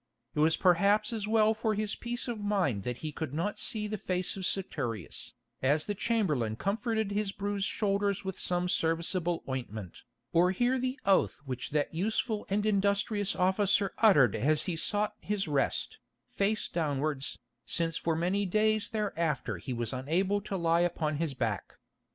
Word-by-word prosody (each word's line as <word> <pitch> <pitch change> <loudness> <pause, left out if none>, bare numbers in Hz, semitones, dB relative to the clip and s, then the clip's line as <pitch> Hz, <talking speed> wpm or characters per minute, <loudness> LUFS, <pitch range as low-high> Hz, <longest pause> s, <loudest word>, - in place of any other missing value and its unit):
It - - -3
was 160 +1 +4
perhaps 200 +5 +3
as 215 -2 -2
well 220 0 +4
for 220 0 -1
his 215 0 -1
peace 240 +1 -3
of 235 -3 -3
mind 195 - 0
that 125 0 -3
he 155 - -2
could 150 -2 -5
not 205 +6 -2
see 215 -4 -1
the 210 0 -3
face 180 0 -1
of 190 -2 -4
Saturius, 115 - -3 0.3
as 145 +4 +2
the 205 - -1
chamberlain 180 - 0
comforted 220 - -1
his 205 -1 -1
bruised 200 0 -2
shoulders 200 -1 0
with 190 -1 -4
some 180 0 0
serviceable 170 +1 0
ointment, 110 -8 -5 0.3
or 175 +2 +5
hear 245 +6 +2
the 255 +3 -2
oath 195 -1 +3
which 130 -2 -4
that 150 +1 0
useful 215 +5 -1
and 205 +2 +1
industrious 205 0 +1
officer 195 +2 +2
uttered 150 - +6
as 150 +3 +2
he 175 - -1
sought 205 +5 0
his 205 -3 -2
rest, 145 -3 0 0.3
face 210 +2 0
downwards, 145 -3 -1 0.3
since 165 -1 0
for 165 -1 0
many 180 +5 +1
days 215 +2 +2
thereafter 165 - -1
he 130 - -6
was 120 -1 -2
unable 180 +10 0
to 200 -1 -4
lie 170 -1 +3
upon 155 -4 0
his 155 -3 -2
back. 115 -6 -2
190 Hz, 165 wpm, -30 LUFS, 155-210 Hz, 0.3 s, uttered